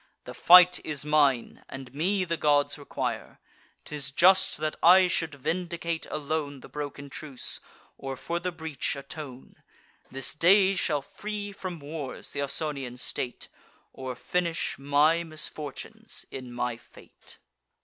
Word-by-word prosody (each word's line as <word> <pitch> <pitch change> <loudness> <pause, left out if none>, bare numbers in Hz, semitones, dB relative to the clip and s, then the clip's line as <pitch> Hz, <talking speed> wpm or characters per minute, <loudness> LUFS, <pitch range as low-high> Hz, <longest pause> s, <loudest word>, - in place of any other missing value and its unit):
The - - -8
fight 180 0 +7
is 150 -2 -3
mine; 145 -5 +2
and 135 -1 -8
me 185 +6 +1
the 170 -1 -1
gods 145 -2 +2
require. 145 - -4 0.5
'Tis 145 -3 -3
just 185 +7 +5
that 155 0 -2
I 185 +2 +8
should 165 -3 -1
vindicate 170 +2 -3
alone 145 -2 -3
The - - -11
broken 145 -1 -6
truce, 140 -1 -5 0.4
or 135 -1 -5
for 170 +6 -3
the 180 +1 -2
breach 160 -4 -3
atone. 140 -2 -8 0.5
This 135 -1 -1
day 190 +5 +5
shall 150 -6 0
free 205 +4 -6
from 185 -3 -6
wars 145 -2 -6
th' - - -8
Ausonian 140 -3 -2
state, 125 0 -3 0.5
Or 130 -1 -5
finish 170 +4 -1
my 145 +4 +3
misfortunes 155 -3 -4
in 130 -2 -7
my 120 -1 -2
fate." - - -15
150 Hz, 135 wpm, -28 LUFS, 140-170 Hz, 0.5 s, I